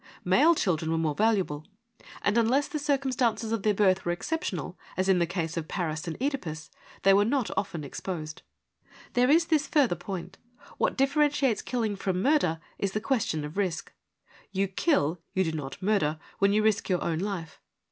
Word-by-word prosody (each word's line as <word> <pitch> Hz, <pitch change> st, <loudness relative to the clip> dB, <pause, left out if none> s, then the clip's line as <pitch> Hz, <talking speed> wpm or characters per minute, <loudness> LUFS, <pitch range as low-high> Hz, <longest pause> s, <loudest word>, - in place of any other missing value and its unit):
Male 290 Hz, -, +5 dB
children 165 Hz, -, 0 dB
were 165 Hz, -, +1 dB
more 160 Hz, -2 st, 0 dB
valuable, 190 Hz, -6 st, +1 dB, 0.6 s
and 205 Hz, -, +2 dB
unless 245 Hz, +5 st, +3 dB
the 310 Hz, -4 st, -4 dB
circumstances 260 Hz, -6 st, 0 dB
of 225 Hz, -2 st, 0 dB
their 210 Hz, 0 st, +2 dB
birth 190 Hz, -2 st, +3 dB
were 175 Hz, -, 0 dB
exceptional, 325 Hz, -, -3 dB, 0.2 s
as 185 Hz, 0 st, +1 dB
in 190 Hz, -2 st, +4 dB
the 170 Hz, -, +2 dB
case 170 Hz, -2 st, -3 dB
of 160 Hz, -1 st, -3 dB
Paris 160 Hz, -3 st, -3 dB
and 165 Hz, -, -4 dB
(Edipus, 180 Hz, -, -3 dB, 0.3 s
they 195 Hz, -, +6 dB
were 200 Hz, +1 st, +5 dB
not 250 Hz, +2 st, 0 dB
often 175 Hz, -6 st, -2 dB
exposed. 155 Hz, +1 st, -6 dB, 0.7 s
There 250 Hz, +1 st, +3 dB
is 330 Hz, +3 st, +5 dB
this 310 Hz, -3 st, +1 dB
further 275 Hz, -, +3 dB
point: 175 Hz, +1 st, -7 dB, 0.4 s
what -, -, +1 dB
differentiates 280 Hz, -4 st, +2 dB
killing 225 Hz, -5 st, -1 dB
from 190 Hz, -2 st, -1 dB
murder 230 Hz, -, +2 dB, 0.2 s
is 195 Hz, -1 st, -1 dB
the 215 Hz, -, 0 dB
question 220 Hz, -, -1 dB
of 150 Hz, +5 st, -8 dB
risk. 180 Hz, -5 st, -2 dB, 0.6 s
You 195 Hz, 0 st, 0 dB
kill, 180 Hz, -, +1 dB
you 190 Hz, -, +3 dB
do 160 Hz, -, -1 dB
not 145 Hz, -4 st, -5 dB
murder, 185 Hz, -7 st, +2 dB, 0.2 s
when 200 Hz, 0 st, +4 dB
you 215 Hz, +1 st, +3 dB
risk 215 Hz, -2 st, +1 dB
your 180 Hz, -2 st, +1 dB
own 165 Hz, -1 st, -1 dB
life. 185 Hz, -4 st, -4 dB
195 Hz, 180 wpm, -28 LUFS, 170-245 Hz, 0.7 s, they